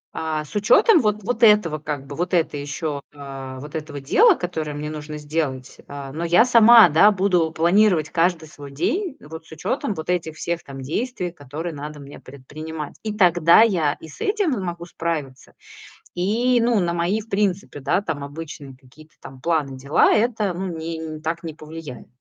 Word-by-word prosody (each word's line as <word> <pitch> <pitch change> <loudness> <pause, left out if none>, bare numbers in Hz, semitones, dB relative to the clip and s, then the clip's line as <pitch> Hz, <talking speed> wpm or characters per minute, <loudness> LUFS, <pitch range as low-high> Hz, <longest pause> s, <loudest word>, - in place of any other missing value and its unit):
а, 155 -1 -3
с 150 - -15
учётом 325 - +5
вот 210 -2 0
вот 240 +2 -3
этого 210 -9 +5
как 145 -2 -5
бы, 140 0 -8
вот 175 +2 -3
это 165 -3 +1
ещё, 145 0 -4
а, 135 -2 -8
вот 145 +2 -10
этого 155 -2 -5
дела, 390 - +4
которое 160 -4 -4
мне 150 +1 -5
нужно 150 0 -7
сделать, 145 -4 -4
а, 140 -1 -8
но 160 +4 -5
я 175 +8 +5
сама, 230 -3 +8
да, 165 +7 +6
буду 185 -5 +1
планировать 170 -1 +2
каждый 170 -1 +1
свой 145 -2 -11
день 280 - -2
вот 160 +1 -10
с - - -20
учётом 190 +5 -3
вот 160 +2 -7
этих 165 -3 -2
всех 170 +1 -3
там 135 -1 -9
действий, 180 - -3
которые 155 +2 -7
надо 150 +1 -8
мне 140 0 -11
предпринимать. 150 +3 -8
И 215 -1 -4
тогда 175 -2 +5
я 170 -10 +3
и 160 - -13
с 150 - -14
этим 405 -6 0
могу 175 -6 -4
справиться, 155 -7 -5 0.6
и, 230 +7 +1
ну, 235 -2 +2
на 175 -3 0
мои 175 +5 0
в 215 - -13
принципе, 195 -6 -1
да, 180 +7 +1
там, 160 -7 -4
обычные 145 -2 -8
какие-то 140 +4 -19
там 130 -1 -12
планы, 150 -5 -1
дела, 140 +3 +3
это, 215 -4 0
ну, 190 +2 -4
не 160 -1 -5
так 165 +1 -3
не 160 -3 -6
повлияет. 155 -4 -10
160 Hz, 185 wpm, -22 LUFS, 150-195 Hz, 0.6 s, сама